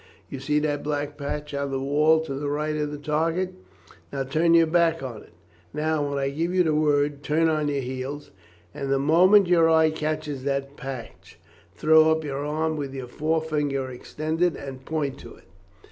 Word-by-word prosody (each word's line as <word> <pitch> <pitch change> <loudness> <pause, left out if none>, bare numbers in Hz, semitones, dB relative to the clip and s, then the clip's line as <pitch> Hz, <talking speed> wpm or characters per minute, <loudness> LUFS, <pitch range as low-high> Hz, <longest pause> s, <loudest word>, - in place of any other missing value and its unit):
You 135 - -6
see 150 +3 0
that 150 -1 0
black 145 -1 -3
patch 150 +1 -5
on 140 0 -2
the 135 -1 -2
wall 150 +4 +3
to 160 -3 -5
the 145 +1 -3
right 150 +1 -1
of 150 -1 -1
the 150 - -5
target. 165 +5 -1 0.6
Now 135 - -2
turn 160 +5 +2
your 165 0 +6
back 165 0 +2
to 130 -7 -6
it. - - -14 0.5
Now, 150 -1 0
when 140 - -2
I 135 0 -1
give 165 +5 -2
the 155 - +2
word, 145 -1 +1
turn 155 +3 +2
on 155 -2 +1
your 140 -1 -1
heels, 130 +3 -6 0.4
and 135 0 -4
the 135 - +3
moment 180 +8 +5
your 170 -2 +4
eye 160 -1 +4
catches 155 -3 -3
that 140 0 -2
patch 135 -5 -9 0.4
throw 160 0 +5
up 160 0 +1
your 140 -1 -4
arm 155 +2 -1
with 140 -2 -5
your 130 -2 -5
forefinger 150 -2 -1
extended 155 +6 -2
and 130 -1 -8
point 145 -4 -2
to - - -11
it. - - -21
150 Hz, 190 wpm, -25 LUFS, 140-160 Hz, 0.6 s, your